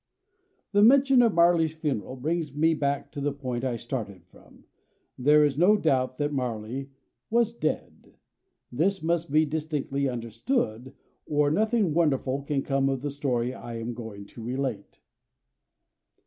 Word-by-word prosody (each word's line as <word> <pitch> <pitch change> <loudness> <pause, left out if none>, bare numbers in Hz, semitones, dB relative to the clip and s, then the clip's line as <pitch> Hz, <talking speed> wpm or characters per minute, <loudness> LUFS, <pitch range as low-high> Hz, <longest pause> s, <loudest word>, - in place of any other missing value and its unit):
The 205 0 +3
mention 265 +3 +6
of 230 -6 +3
Marley's 170 -2 +4
funeral 140 -6 -3
brings 150 +2 -2
me 160 +2 +3
back 140 -2 -2
to 140 - -6
the 145 +1 0
point 130 -3 -4
I 130 -2 -1
started 110 -6 -6
from. - - -20 0.5
There 150 +4 +4
is 145 0 -1
no 205 +5 +5
doubt 130 -7 0
that 145 0 -1
Marley 125 +1 -3 0.4
was 230 0 +2
dead. 155 -9 -4 0.6
This 175 +8 0
must 170 -2 0
be 155 +1 +4
distinctly 145 -3 -2
understood, 120 - -3 0.3
or 145 -1 +2
nothing 215 -1 +1
wonderful 140 -4 +1
can 140 -1 -2
come 135 -1 +1
of 135 -1 -2
the 145 - -2
story 130 -3 -1
I 120 -2 -7
am 115 +1 -4
going 110 -4 -8
to 115 - -12
relate. 125 -3 -4
140 Hz, 150 wpm, -27 LUFS, 125-160 Hz, 0.6 s, mention